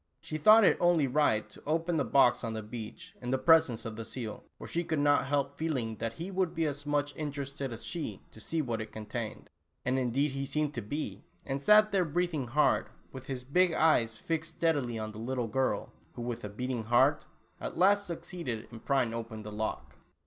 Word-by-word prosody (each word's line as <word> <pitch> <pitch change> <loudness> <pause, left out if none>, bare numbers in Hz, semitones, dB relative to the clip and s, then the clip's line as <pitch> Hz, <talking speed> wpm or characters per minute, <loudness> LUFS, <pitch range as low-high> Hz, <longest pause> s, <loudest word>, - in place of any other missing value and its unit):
She 155 +1 -5
thought 215 +7 +8
it - - +5
only 175 -4 +4
right 130 -5 +2
to - - -14
open 165 +2 +1
the 145 - +2
box 130 -3 +4
on 115 - -2
the 110 -1 -4
beach, 110 0 -8
in 125 - -4
the 130 - +2
presence 160 -6 +4
of 110 -2 -5
the 115 - -4
seal, 110 -2 -6
for - - -9
she 170 - -1
could 160 -2 -1
not 145 -2 +3
help 140 0 -1
feeling 130 -9 -1
that 115 +2 -3
he 170 +10 -6
w^ould 185 -3 0
be 165 0 +1
as 145 0 -4
much 145 -1 0
interested 140 -2 -4
as 115 0 -7
she 145 - -4
to - - -14
see 160 +8 -1
what 115 -4 -2
it 110 - -7
contained. 110 +1 -6 0.3
And 130 +1 +1
indeed 130 +4 +1
he 135 0 -3
seemed 150 0 -1
to 120 - -3
be, 145 +9 -4 0.2
and 135 0 -2
sat 210 +5 +6
there 195 -2 +3
breathing 160 -4 -1
hard, 150 +6 +2 0.2
with 130 -1 -9
his 130 -2 -4
big 175 +6 +3
eyes 115 -9 +3
fixed 165 +5 -3
steadily 145 -8 +1
on 110 -1 -4
the 105 - -9
little 125 +1 -2
girl 130 +4 -1 0.2
who, 120 - -6
with 110 -4 -5
beating 125 -3 -2
heart, 120 +2 +3 0.3
at - - -5
last 200 +3 +4
suc 170 -1 -5
ceeded 130 -11 -6
in 115 - -8
prying 130 -3 +1
open 115 -2 -5
the 105 - -7
lock. 110 +1 -4
135 Hz, 215 wpm, -31 LUFS, 115-160 Hz, 0.3 s, thought